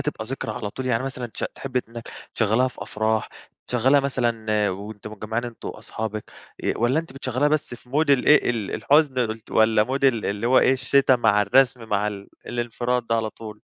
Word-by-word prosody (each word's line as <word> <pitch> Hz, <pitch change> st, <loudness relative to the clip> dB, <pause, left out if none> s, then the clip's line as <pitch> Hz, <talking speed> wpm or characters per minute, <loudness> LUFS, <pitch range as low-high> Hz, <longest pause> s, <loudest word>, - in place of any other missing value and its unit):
تبقى 150 Hz, -7 st, -3 dB
ذكرى 115 Hz, -3 st, -4 dB
على 105 Hz, -1 st, -5 dB
طول. 130 Hz, +3 st, -6 dB
يعني 120 Hz, 0 st, +1 dB
مثلًا 130 Hz, -2 st, -4 dB
تشغ 110 Hz, -, -4 dB
تحبي 130 Hz, -2 st, -2 dB
إنّك 115 Hz, 0 st, -9 dB, 0.3 s
تشغليها 115 Hz, +4 st, +2 dB
في -, -, -10 dB
أفراح؟ 110 Hz, +1 st, -1 dB, 0.4 s
تشغليها 130 Hz, +4 st, +3 dB
مثلًا 115 Hz, -6 st, 0 dB
وأنتم 105 Hz, +2 st, -8 dB
مجمعين 110 Hz, +3 st, -3 dB
أنتم 120 Hz, -2 st, -7 dB
وأصحابك؟ 110 Hz, -1 st, -5 dB, 0.4 s
آآ، -, -, +2 dB
والّا 120 Hz, +7 st, +2 dB
أنتِ 165 Hz, -5 st, -13 dB
بتشغليها 135 Hz, +1 st, 0 dB
بس 150 Hz, -5 st, -1 dB
في 125 Hz, -, -17 dB
مود 145 Hz, +2 st, +1 dB
الإيه 140 Hz, 0 st, +5 dB
ال 110 Hz, -5 st, -3 dB
الحزن؟ 130 Hz, -7 st, +2 dB
ت -, -, -19 dB
والّا 110 Hz, -1 st, +4 dB
مود 135 Hz, +2 st, -2 dB
ال 120 Hz, -5 st, +3 dB
اللي 105 Hz, +3 st, -2 dB
هو 130 Hz, +1 st, +5 dB
إيه 130 Hz, -, +4 dB
الشتا 130 Hz, 0 st, +3 dB
مع 105 Hz, -3 st, +3 dB
الرسم 125 Hz, +2 st, +3 dB
مع 105 Hz, 0 st, +1 dB
ال 100 Hz, -1 st, -8 dB, 0.2 s
الانفراد 120 Hz, 0 st, -2 dB
ده 115 Hz, -, +1 dB
على 110 Hz, -1 st, -1 dB
طول؟ 105 Hz, -2 st, -10 dB
120 Hz, 190 wpm, -23 LUFS, 110-130 Hz, 0.4 s, الإيه